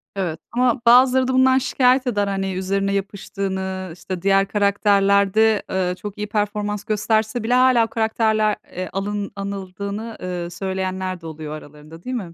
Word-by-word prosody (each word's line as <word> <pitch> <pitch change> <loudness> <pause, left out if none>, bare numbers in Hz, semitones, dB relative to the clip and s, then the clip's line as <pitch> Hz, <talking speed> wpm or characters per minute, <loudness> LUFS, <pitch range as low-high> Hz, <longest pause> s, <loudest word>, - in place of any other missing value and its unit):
Evet 175 -5 -3
ama 250 +1 +1
bazıları 255 +2 +6
da 260 - 0
bundan 260 0 +5
şikâyet 255 0 +2
eder, 205 -4 0
hani, 195 -1 -2
üzerine 195 +2 -1
yapıştığını, 190 -1 -4
işte, 180 +1 -6
diğer 195 +1 +3
karakterlerde, 200 +1 +3
eee, 180 -1 -1
çok 205 0 -7
iyi 210 0 -3
performans 210 0 -2
gösterse 220 +2 0
bile 235 +2 0
hâlâ 255 -2 +5
o - - -7
karakterle, 220 -3 +1 0.2
eee, 185 0 -5
alın 200 +1 -3
anıldığını, 200 +3 -5
eee, 180 -1 -4
söyleyenler 185 0 -3
de - - -13
oluyor 155 -1 -7
aralarında 155 +2 -12
değil 255 - -4
mi 185 -8 -5
200 Hz, 155 wpm, -21 LUFS, 190-220 Hz, 0.2 s, bazıları